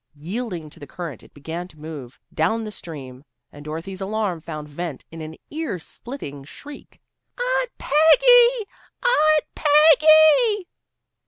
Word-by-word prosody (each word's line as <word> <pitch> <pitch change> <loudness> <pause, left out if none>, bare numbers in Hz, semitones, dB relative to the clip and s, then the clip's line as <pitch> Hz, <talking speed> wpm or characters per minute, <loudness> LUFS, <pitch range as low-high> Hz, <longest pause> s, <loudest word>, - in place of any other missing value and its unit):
Yielding 180 0 -5
to 150 - -14
the 145 - -10
current 165 - -7
it - - -19
began 165 +5 -7
to 155 - -20
move 150 -4 -9
down 200 +9 0
the 215 - -6
stream, 140 -9 -10 0.3
and 145 - -12
Dorothy's 165 +5 -7
alarm 200 -3 -2
found 155 -2 -7
vent 150 -1 -6
in 165 0 -9
an 155 0 -8 0.2
ear 310 - -3
splitting 160 - -9
shriek. 285 - -13 0.4
"Aunt - - 0
Peggy! 475 - +5 0.4
Aunt 310 -11 +3
Peggy!" 310 - +5
190 Hz, 135 wpm, -22 LUFS, -, 0.4 s, Peggy